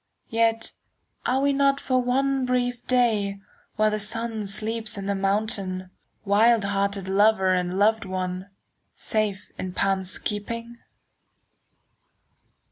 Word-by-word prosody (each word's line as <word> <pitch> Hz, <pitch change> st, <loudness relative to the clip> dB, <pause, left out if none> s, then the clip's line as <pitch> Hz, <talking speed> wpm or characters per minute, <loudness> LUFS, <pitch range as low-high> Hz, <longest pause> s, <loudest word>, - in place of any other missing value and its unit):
Yet, 225 Hz, 0 st, +1 dB, 0.6 s
are 265 Hz, +1 st, +2 dB
we 280 Hz, 0 st, +3 dB
not 275 Hz, 0 st, +3 dB
for 255 Hz, -2 st, +1 dB
one 270 Hz, +2 st, +1 dB
brief 245 Hz, -1 st, -1 dB
day, 215 Hz, -6 st, +2 dB, 0.4 s
While 215 Hz, 0 st, +3 dB
the 215 Hz, -, -1 dB
sun 220 Hz, 0 st, -1 dB
sleeps 220 Hz, +2 st, -2 dB
on 195 Hz, -, -5 dB
the 200 Hz, -, 0 dB
mountain, 195 Hz, -1 st, 0 dB
10 185 Hz, 0 st, -9 dB, 0.4 s
Wild 220 Hz, +2 st, +4 dB
hearted 200 Hz, -1 st, -1 dB
lover 195 Hz, 0 st, +4 dB
and 180 Hz, 0 st, +1 dB
loved 220 Hz, +2 st, +3 dB
one, 185 Hz, 0 st, -4 dB, 0.5 s
Safe 215 Hz, -4 st, -2 dB
in 185 Hz, -1 st, -4 dB
Pan's 190 Hz, -1 st, 0 dB
keeping? 230 Hz, +3 st, -5 dB
215 Hz, 125 wpm, -25 LUFS, 195-235 Hz, 0.6 s, Wild